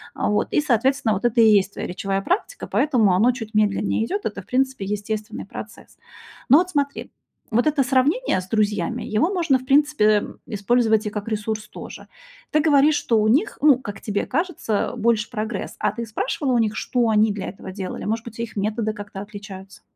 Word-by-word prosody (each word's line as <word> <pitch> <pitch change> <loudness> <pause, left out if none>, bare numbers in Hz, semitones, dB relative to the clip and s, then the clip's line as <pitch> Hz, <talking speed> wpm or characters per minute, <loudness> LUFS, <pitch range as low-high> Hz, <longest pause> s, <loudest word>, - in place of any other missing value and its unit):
А, - - 0
вот. 210 - +1
И, - - +3
соответственно, 265 -3 +1
вот 200 +3 -3
это 240 -1 +2
и 225 - +7
есть 200 -2 +4
твоя - - -5
речевая 195 +2 -2
практика, 395 - -2
поэтому 240 -10 +2
оно 220 +7 +4
чуть 225 -3 -8
медленнее 210 0 +1
идёт, 395 - -3
это, 205 -2 -3
в - - -23
принципе, 265 -4 0
естественный 210 +1 -4
процесс. - - -10 0.5
Но 280 +5 +8
от 360 +1 -1
смотри, 285 -3 -2 0.4
вот 240 +2 +2
это 305 -2 +2
сравнение 270 - +1
с 185 - -13
друзьями, 210 +2 0
его 235 - 0
можно, 330 -8 +2
в 255 - -12
принципе, 290 -1 +3
эм, 210 -1 +1
использовать 220 +1 +1
и - - -1
как 210 +1 -5
ресурс 215 0 -3
тоже. - - -10 0.4
Ты 305 - +3
говоришь, 300 -1 +4
что 225 -2 +1
у 215 - +2
них, 320 - +2
ну, 285 -4 +6
как 205 -5 -8
тебе 205 -2 -2
кажется, 290 - -1
больше 225 -1 +1
прогресс, 215 -3 -4
а - - 0
ты 235 - -5
спрашивала 255 +4 -2
у - - +3
них, 220 -2 +1
что 245 -2 0
они 215 0 +3
для 205 -1 -5
этого 190 0 -8
делали? 190 -1 -6
Может 225 +2 -2
быть, 230 -1 -10
их 230 -2 -5
методы 215 +2 -1
как-то 205 -2 -8
отличаются? 200 -2 -10
220 Hz, 200 wpm, -22 LUFS, 210-265 Hz, 0.5 s, Но